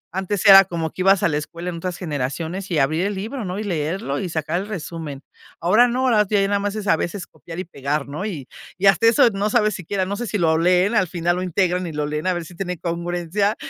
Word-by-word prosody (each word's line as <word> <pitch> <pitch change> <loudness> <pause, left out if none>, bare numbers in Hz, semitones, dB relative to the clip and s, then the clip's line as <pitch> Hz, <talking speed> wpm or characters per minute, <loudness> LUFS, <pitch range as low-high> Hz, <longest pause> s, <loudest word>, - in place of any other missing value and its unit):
antes 190 0 -2
era 195 -1 +10
como 165 -3 -3
que - - -6
ibas 195 0 +4
a - - +5
la 150 - 0
escuela 170 +4 -5
en 170 - -6
otras 180 +1 -4
generaciones 160 +4 -4
y 165 - +1
abrir 155 +6 +1
el 205 - -3
libro, 220 +4 -5
¿no?, 180 +2 -4
y - - -3
leerlo 165 -4 -2
y 185 - -3
sacar 165 +2 -2
el 200 - -7
resumen. 165 -7 -6 0.4
Ahora 215 +8 +4
no, 250 +2 -1
ahora 215 -4 +4
ya 210 - +3
nada 200 0 +1
más 205 +1 -2
es 215 -1 -4
a - - +5
veces 180 +1 -4
copiar 165 0 -11
y - - -2
pegar, 140 -2 -3
¿no? 150 +7 -5
Y 160 -11 -5 0.3
y 190 - -1
hasta 230 +3 +5
eso 230 +1 +6
no 200 +1 -1
sabes 215 -2 +2
siquiera, 185 +2 -2
no 200 +2 -3
sé 240 +3 -4
si 210 - -1
lo 160 -3 +2
leen, 180 +4 +3
al 185 -4 +3
final 175 +1 -1
lo - - -2
integran 180 0 0
y 160 - -6
lo 150 0 -2
leen, 150 +3 -3
a 185 - +2
ver 175 -1 -4
si 175 - -13
tiene 180 0 -4
congruencia, 175 +4 -1
180 Hz, 260 wpm, -21 LUFS, 165-200 Hz, 0.4 s, era